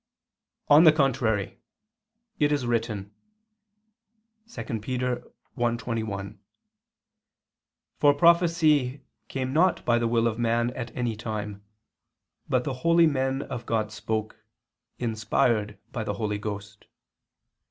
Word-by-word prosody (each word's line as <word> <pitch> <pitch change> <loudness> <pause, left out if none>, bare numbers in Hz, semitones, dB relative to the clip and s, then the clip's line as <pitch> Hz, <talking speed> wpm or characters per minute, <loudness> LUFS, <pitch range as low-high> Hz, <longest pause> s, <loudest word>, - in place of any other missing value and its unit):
On 150 +3 +7
the 160 - +9
contrary, 125 -9 0 0.8
It 145 -1 +3
is 145 -4 0
written 110 -4 -2 1.4
(2 235 - -6
Pet. - - -18
1:21): 115 -3 -3 1.6
"For 145 - +6
prophecy 155 -5 +3 0.2
came 130 -1 -3
not 180 +4 +2
by 120 0 +3
the 120 - +1
will 115 0 +2
of 115 0 -1
man 120 +1 +1
at 120 -1 -6
any 120 -3 -1
time, 105 -2 -5 0.9
but 130 -1 +2
the 135 - -3
holy 170 +2 +5
men 135 -2 0
of 120 - -7
God 110 -2 0
spoke, 110 0 -4 0.5
inspired 110 -2 0
by 115 - -3
the 105 -1 -3
Holy 105 -1 -2
Ghost." 105 -1 -7
120 Hz, 110 wpm, -26 LUFS, 110-135 Hz, 1.6 s, the